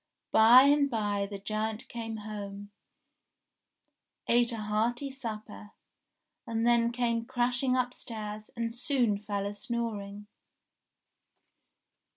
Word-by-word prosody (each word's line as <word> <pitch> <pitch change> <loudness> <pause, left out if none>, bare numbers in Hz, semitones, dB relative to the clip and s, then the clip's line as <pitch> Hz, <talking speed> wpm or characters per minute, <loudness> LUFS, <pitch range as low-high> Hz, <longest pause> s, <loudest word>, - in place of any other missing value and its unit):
By 230 +4 +8
and 285 0 +4
by 205 -4 -1
the 200 - -5
giant 215 +2 -3
came 225 -2 -5
home, 205 -1 -7 1.6
ate 240 0 +3
a 230 - -4
hearty 225 +6 -1
supper, 215 - -7 0.7
and 230 0 -1
then 235 -1 +4
came 235 -1 0
crashing 250 +1 +1
upstairs, 215 -4 -4
and 230 0 -2
soon 240 -4 +1
fell 205 -1 -3
a 200 - -3
snoring. 205 -3 -4
225 Hz, 105 wpm, -30 LUFS, 210-240 Hz, 1.6 s, By